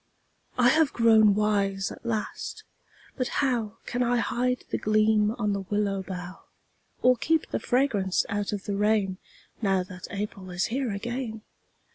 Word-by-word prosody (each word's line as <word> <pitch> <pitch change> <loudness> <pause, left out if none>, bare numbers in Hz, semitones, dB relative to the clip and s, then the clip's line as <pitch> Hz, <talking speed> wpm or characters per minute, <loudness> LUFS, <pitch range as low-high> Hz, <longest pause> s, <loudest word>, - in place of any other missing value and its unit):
I 245 -1 +5
have 310 0 +3
grown 220 -3 +5
wise 200 -2 +1
at - - -11
last 235 - -4 0.5
but 255 -2 -1 0.2
how 230 -4 -1
Can 245 - -2
I 245 0 +2
hide 250 +1 0
the - - 0
gleam 215 0 +3
on 210 -4 0
the 200 - -2
willow 200 0 -1
bough, 185 -1 -7 0.6
Or 255 0 +6
keep 320 +6 0
the - - 0
fragrance 225 -8 +1
out 205 0 -2
of 205 -2 -4
the 200 - -3
rain 205 -2 +1 0.4
Now 195 -3 +2
that 185 0 -9
April 200 -2 -5
is 180 +1 -1
here 260 -3 -1
again? 225 +1 -4
210 Hz, 155 wpm, -27 LUFS, 195-240 Hz, 0.6 s, Or